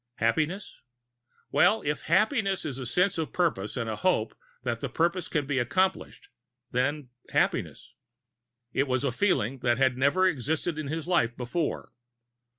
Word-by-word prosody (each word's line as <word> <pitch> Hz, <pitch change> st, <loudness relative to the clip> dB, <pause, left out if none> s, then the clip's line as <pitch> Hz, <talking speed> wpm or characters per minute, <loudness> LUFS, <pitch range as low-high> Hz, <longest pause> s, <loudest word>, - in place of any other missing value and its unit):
Happiness? 155 Hz, -, -1 dB, 0.7 s
Well, 220 Hz, -, +4 dB
if 150 Hz, 0 st, -2 dB
"happiness" 195 Hz, -, +2 dB
is 135 Hz, -4 st, -4 dB
a 130 Hz, -, -4 dB
sense 180 Hz, -, +1 dB
of 160 Hz, -, -2 dB
purpose, 140 Hz, -, -1 dB
and 115 Hz, -2 st, -2 dB
a 110 Hz, -1 st, -3 dB
hope 115 Hz, -13 st, +1 dB, 0.3 s
that 120 Hz, -2 st, -2 dB
the -, -, -3 dB
purpose 175 Hz, +2 st, 0 dB
can 150 Hz, -3 st, -1 dB
be 140 Hz, -1 st, 0 dB
accomplished, 185 Hz, +10 st, -1 dB, 0.4 s
then 135 Hz, +2 st, -1 dB, 0.2 s
happiness. -, -, -1 dB, 0.8 s
It 140 Hz, -, +1 dB
was 130 Hz, 0 st, 0 dB
a 140 Hz, -, +1 dB
feeling 135 Hz, -, +1 dB
that 120 Hz, -1 st, +1 dB
had 130 Hz, -1 st, +2 dB
never 145 Hz, +8 st, +3 dB
existed 160 Hz, 0 st, 0 dB
in 155 Hz, -, -4 dB
his 160 Hz, +2 st, -4 dB
life 120 Hz, -10 st, +1 dB
before. 145 Hz, +6 st, -3 dB
145 Hz, 155 wpm, -28 LUFS, 125-175 Hz, 0.8 s, Well